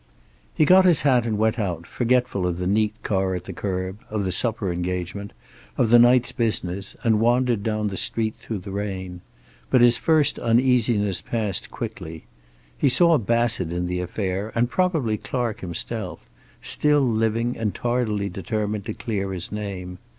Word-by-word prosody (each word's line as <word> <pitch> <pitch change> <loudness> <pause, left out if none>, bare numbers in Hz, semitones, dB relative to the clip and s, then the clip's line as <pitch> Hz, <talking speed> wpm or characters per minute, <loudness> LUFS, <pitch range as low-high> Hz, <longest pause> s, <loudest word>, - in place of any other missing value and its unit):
He 155 - +4
got 185 +4 +7
his 175 -4 +5
hat 125 -4 +3
and 110 -2 -1
went 110 +2 +1
out, 85 -5 -3
forgetful 125 -5 0
of 85 -1 -2
the 90 - -3
neat 105 +2 +1
car 95 -2 0
at 90 - -5
the 95 - -8
curb, 95 +2 -4
of 105 -1 -2
the 95 - -1
supper 105 0 0
engagement, 90 +3 -4 0.5
of 115 - +2
the 120 - +8
night's 120 +1 +5
business, 100 -4 -2
and 110 -2 +3
wandered 120 -1 +2
down 105 0 -1
the 95 - -5
street 110 -1 -1
through 110 - -6
the 100 - -6
rain. 95 -3 -5 0.5
But 130 - +4
his 120 0 +5
first 155 -3 +2
uneasiness 115 -4 +2
passed 105 -5 -2
quickly. 80 0 -7 0.5
He 140 - +2
saw 165 +5 +4
Bassett 115 -5 +1
in 90 +1 -2
the 90 0 -2
affair, 95 +3 -3
and 120 +1 +1
probably 160 -12 +1
Clark 120 -4 -3
himself, 85 -3 -5 0.4
still 150 -1 +3
living 115 +1 0
and 110 -3 -2
tardily 120 -4 -1
determined 105 +2 -3
to - - -5
clear 100 -5 -3
his 90 -2 -5
name. 95 -4 -6
105 Hz, 165 wpm, -23 LUFS, 95-120 Hz, 0.5 s, the